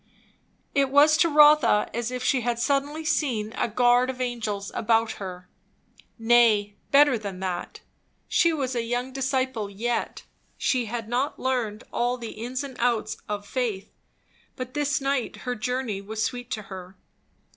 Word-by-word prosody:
It 275 -1 +2
was 290 +3 +6
to 335 +1 +4
Rotha 295 -8 +6
as 235 0 -2
if 250 0 -4
she 260 -1 +2
had 240 0 -1
suddenly 285 +5 -1
seen 225 -9 0
a - - 0
guard 245 +2 +3
of 260 -1 -5
angels 225 -5 -3
about 225 0 +2
her. 180 -1 -7 0.7
Nay, 225 -3 +4
better 280 -4 +5
than 200 -3 -6
that. 180 -2 -4 0.5
She 335 - +3
was 270 -5 -2
a 235 - +1
young 245 +3 -3
disciple 260 -5 -1
yet, 230 +4 -3 0.3
she 250 -3 +1
had 225 0 -5
not 250 +5 -1
learned 240 -5 -1
all 245 +1 0
the 230 -2 -7
ins 245 +5 -4
and 270 -2 -8
outs 230 -3 0
of 205 -1 -3
faith; 220 -5 -3 0.6
but 255 -1 -6
this 295 +1 0
night 275 -2 -1
her 250 - -1
journey 245 -3 -2
was 215 +2 -3
sweet 245 -1 -3
to 215 - -4
her. 185 -1 -10
245 Hz, 155 wpm, -25 LUFS, 215-260 Hz, 0.7 s, was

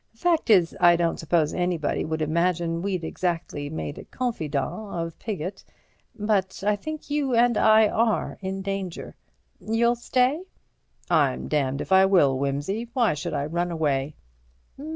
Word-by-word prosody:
Fact 330 +3 +1
is, 180 -6 +4
I 175 0 +6
don't 170 -1 0
suppose 160 -1 +1
anybody 175 -4 -1
would 160 0 -2
imagine 170 +1 0
we'd 185 -2 -2
exactly 165 -4 -3
made 150 -1 -5
a - - -10
confidant 160 - -2 0.3
of 165 -1 -4
Piggott. 195 -4 -5 0.5
But 205 -3 -1
I 210 0 +3
think 310 +7 -7
you 285 -4 0
and 240 0 +4
I 220 0 +5
are 220 -6 0
in 190 0 -4
danger. 195 -3 -4 0.5
You'll 235 +2 +1
stay?" 255 +5 +1 0.7
"I'm 140 -4 +2
damned 140 -2 0
if - - -7
I 190 0 +6
will, 145 -9 +3
Wimsey; 145 - -2
why 240 -7 +2
should 150 +1 -4
I 140 0 -1
run 175 +3 -1
away?" 150 -3 -1
180 Hz, 150 wpm, -25 LUFS, 155-220 Hz, 0.7 s, I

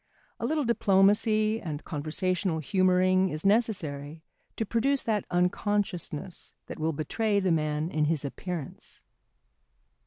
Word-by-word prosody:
A 230 - -1
little 305 +1 0
diplomacy 215 0 +3
and 150 -3 -5
conversational 165 +4 -1
humouring 185 +2 +2
is 155 +2 -5
necessary 165 -9 0 0.3
to 225 - -2
produce 260 +6 +1
that 215 -3 -1
unconsciousness 180 -1 -2
that - - -8
will 160 +1 0
betray 200 +8 0
the 190 -2 +1
man 155 +1 0
in 155 -1 +1
his 150 -2 0
appearance. 165 +1 -7
185 Hz, 120 wpm, -28 LUFS, 155-210 Hz, 0.3 s, diplomacy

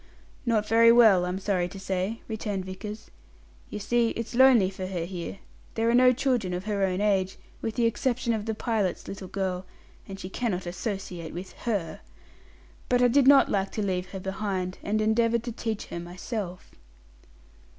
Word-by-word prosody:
"Not 215 -2 +2
very 230 +1 +6
well, 220 -7 +6
I'm 180 +1 -2
sorry 190 -2 0
to 195 - -9
say," 190 +3 -2
returned 210 -4 -3
Vickers. 205 +3 -8 0.6
"You - - -5
see, 235 +3 +1
it's 230 -1 -4
lonely 240 -6 +6
for 190 -1 -5
her 175 -3 -3
here. 180 +1 -6 0.4
There 230 +1 +2
are - - +1
no 250 +1 +6
children 245 -8 0
of 180 - -4
her 205 -2 -1
own 185 -1 +1
age, 195 -2 +1 0.2
with 225 - -3
the 235 -1 +2
exception 240 +1 0
of 215 -1 -3
the 220 - -1
pilot's 215 -6 -1
little 195 -1 -7
girl, 185 -1 -2 0.4
and 195 0 -8
she 185 - -6
cannot 190 -3 -2
associate 180 -3 -5
with 185 +2 -7 0.2
her. 195 -7 -2 0.9
But 250 0 +3
I 245 - +6
did 270 +2 +4
not 280 -1 +7
like 195 -1 0
to 215 - -2
leave 185 -1 -1
her 190 +1 -7
behind, 190 -1 -3
and 215 +1 0
endeavoured 230 +1 +2
to 240 - -4
teach 225 -2 -4
her 170 - -3
myself." 180 +2 -6
205 Hz, 180 wpm, -27 LUFS, 185-230 Hz, 0.9 s, not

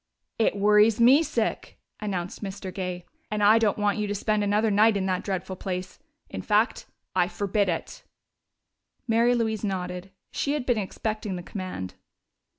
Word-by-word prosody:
"It 220 - +2
worries 210 +2 +4
me 255 +6 +7
sick!" 330 - -2 0.2
announced 190 -2 -4
Mr. 195 -1 -6
Gay. 180 -2 -4 0.2
"And 210 -1 -1
I 215 +2 +7
don't 215 -3 +2
want 205 0 +1
you 210 - -1
to 205 - -2
spend 215 +1 0
another 210 +2 +2
night 210 +1 +4
at 190 - -1
that 185 -1 -1
dreadful 190 -1 -3
place.... 185 -1 -5 0.3
In - - -6
fact, - - +1 0.3
I 180 -1 +3
forbid 200 +2 0
it!" 165 - -4 1.0
Mary 235 +2 +3
Louise 220 -2 -1
nodded: 180 -2 -3 0.2
she 285 - -1
had 295 -4 -2
been 245 -4 +2
expecting 215 0 -3
the 175 - -6
command. 185 - -6
205 Hz, 160 wpm, -26 LUFS, 185-215 Hz, 1.0 s, me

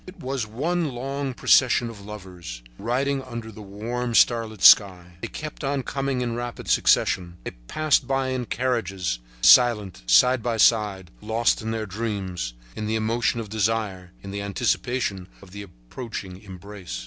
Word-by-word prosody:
It 185 - -12
was 130 -3 -3
one 160 +9 -1
long 135 +1 -4
procession 125 -1 +4
of 110 -3 -10
lovers, 90 -12 -9 0.2
riding 135 +5 -1
under 115 -3 -7
the 110 - -11
warm, 115 +4 -4
starlit 115 -4 +2
sky. 90 -4 +6
They - - -3
kept 155 -1 -8
on 135 -1 -1
coming 135 -1 -2
in 120 -1 -2
rapid 120 0 -6
succession. 85 -2 +2
They - - -5 0.2
passed 155 - +1
by 135 -1 0
in 130 -1 -2
the 120 - -7
carriages, 95 - -2 0.2
silent, 105 - +5
side 125 -1 +5
by 115 0 -1
side, 105 -5 +2
lost 115 +2 +1
in 110 - -4
their 110 -1 -2
dreams, 95 - -4 0.2
in 110 - -4
the 110 - -1
emotion 115 +2 0
of 110 -3 -6
desire, 105 -4 -2
in 100 - -7
the 100 0 -4
anticipation 100 -2 -1
of 95 -2 -16
the 100 +1 -8
approaching 95 - -9
embrace. 95 - -8
110 Hz, 160 wpm, -24 LUFS, 95-125 Hz, 0.2 s, sky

